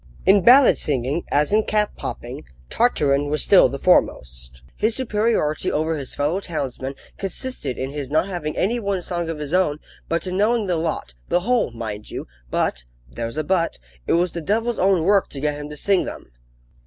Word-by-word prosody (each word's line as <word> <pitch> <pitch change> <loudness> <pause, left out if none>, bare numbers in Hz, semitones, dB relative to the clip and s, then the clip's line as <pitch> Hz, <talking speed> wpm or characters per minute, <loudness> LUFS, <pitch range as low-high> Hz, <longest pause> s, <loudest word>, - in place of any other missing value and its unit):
In 195 +1 +6
ballad 255 +6 +7
singing, 140 +3 -1
as 150 +6 +2
in 215 +1 +4
cap 210 -1 0
popping, - - -6 0.3
Tartarin 145 - +2
was 150 -1 +1
still - - +6
the - - -4
foremost. 60 0 +1
His 220 +1 +1
superiority 215 - 0
over 160 +2 0
his 140 -4 -5
fellow 150 +6 0
townsmen 135 -7 -4 0.2
consisted 195 - -4
in 130 +1 -3
his 145 -2 -5
not 155 +4 +2
having 170 -6 -4
any 235 +6 +1
one 200 -4 -2
song 175 -2 -2
of 165 - -3
his 150 +1 -5
own, 180 -5 +2 0.3
but 165 +1 -1
in 185 0 -2
knowing 220 +2 +2
the 180 -2 0
lot, 160 - -3 0.2
the 175 - +2
whole, 240 - +1
mind 110 -3 -6
you! - - -6 0.2
But - - -1 0.3
there's 115 - -5
a 155 - 0
but 170 0 0 0.3
it - - +2
was 175 +1 +2
the 170 - -5
devil's 225 +7 0
own 190 -3 +3
work 200 +2 +3
to 140 - -7
get 150 +1 0
him 145 0 -7
to 150 - -8
sing 195 +4 +2
them. - - -8
165 Hz, 190 wpm, -22 LUFS, 145-200 Hz, 0.3 s, ballad